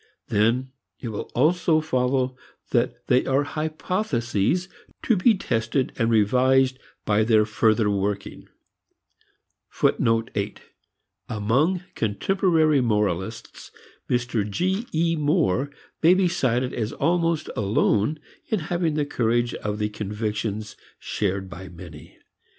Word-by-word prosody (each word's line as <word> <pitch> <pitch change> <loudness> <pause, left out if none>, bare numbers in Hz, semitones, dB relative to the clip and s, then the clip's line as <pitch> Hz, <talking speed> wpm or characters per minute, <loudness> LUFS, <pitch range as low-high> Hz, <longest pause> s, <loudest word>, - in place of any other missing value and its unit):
Then 120 +5 +1 0.3
it 120 - -5
will 105 - -5
also 160 +4 +3
follow 130 -3 0 0.4
that - - 0
they 125 - +3
are 135 +2 +2
hypotheses 155 - -1 0.4
to 230 - +3
be 215 +4 +4
tested 115 -4 -1
and 115 -2 +1
revised 130 +4 +3 0.3
by 105 +1 +3
their 110 -1 +4
further 110 0 +2
working. 100 0 -2 1.3
Among 115 0 +2 1.7
contemporary 155 - +2
moralists, 105 -3 -2 0.4
Mr. 120 -4 0
G. 190 - -1
E. 165 +1 +1
Moore 145 - +1 0.3
may 170 +3 +6
be 190 -1 +3
cited 130 -7 0
as 110 -1 -2
almost 165 -2 0
alone 105 +6 +1 0.3
in 215 - 0
having 170 -3 0
the 150 -1 +1
courage 120 -2 0
of 105 0 -3
the 105 0 -1
convictions 105 0 -4 0.2
shared 95 -2 -2
by 95 0 -9
many. 85 -4 -12
120 Hz, 110 wpm, -24 LUFS, 105-155 Hz, 1.7 s, may